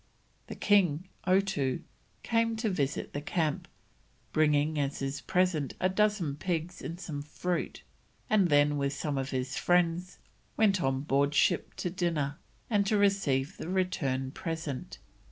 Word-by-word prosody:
The - - -6
king, 185 -4 +2 0.2
Otoo, 185 -9 +1 0.4
came 230 0 +1
to 220 -1 -1
visit 145 -5 -2
the 145 - -3
camp, 155 -1 -1 0.7
bringing 150 0 +3
as 140 0 -1
his 135 +1 -3
present 180 -6 +1
a 185 - +2
dozen 190 -7 +1
pigs 175 +1 -3
and 170 +1 -6
some 150 -6 -5
fruit, 170 +4 -3 0.4
and 200 -5 +3
then 145 0 +4
with 140 0 0
some 145 -1 -2
of 135 0 -3
his 130 -1 -2
friends 175 0 +1 0.4
went 200 -4 +3
on 135 0 0
board 140 +1 +1
ship - - +2
to 180 - -3
dinner, 160 -6 -1 0.3
and 205 -3 +2
to 210 0 +3
receive 190 -7 +1
the 165 - -6
return 140 -9 0
present. 160 -4 -5
160 Hz, 145 wpm, -30 LUFS, 140-185 Hz, 0.7 s, then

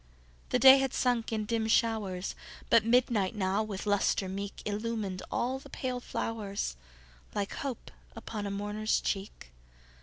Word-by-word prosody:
The - - +3
day 265 +2 +9
had 270 -1 -1
sunk 245 -3 +1
in 215 -1 -1
dim 225 0 0
showers, 215 -5 +1 0.4
But 230 - +7
midnight 230 -4 +2
now, 195 0 +1
with 210 -2 -4
lustre 205 -1 +2
meek, 200 +1 -5
Illumined 210 -3 -2
all 260 +2 -1
the - - -14
pale 255 -1 -3
flowers, 205 - -3 0.6
Like 200 -1 -1
hope 270 -4 -5 0.2
upon 210 -2 -5
a - - -2
mourner's 205 +2 0
cheek. 195 - -4
215 Hz, 145 wpm, -30 LUFS, 200-230 Hz, 0.6 s, day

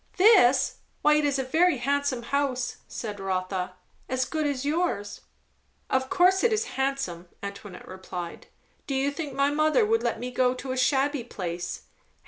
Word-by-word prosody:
"This? 320 - +5 0.2
Why 300 - +6
it 300 0 +3
is 285 -1 +1
a 265 - 0
very 320 +4 +3
handsome 275 0 0
house," 265 0 -1
said 210 -3 -6
Rotha. 185 -1 -2 0.3
"As 255 0 0
good 310 0 -1
as 280 -1 -2
yours." 290 - -1 0.7
"Of 260 0 +1
course 370 +2 +4
it 475 - +4
is 435 +1 +1
handsome," 265 -11 -2 0.2
Antoinette 200 -1 -8
replied. 185 -2 -7 0.4
"Do 275 - -1
you 270 +2 +1
think 285 -2 -5
my 280 +1 +2
mother 310 +9 +3
would 455 +1 +2
let - - -1
me 250 +1 -4
go 250 0 +2
to 255 +1 -5
a - - -1
shabby 270 +1 +1
place. 180 -6 -5
265 Hz, 165 wpm, -27 LUFS, 210-295 Hz, 0.7 s, Why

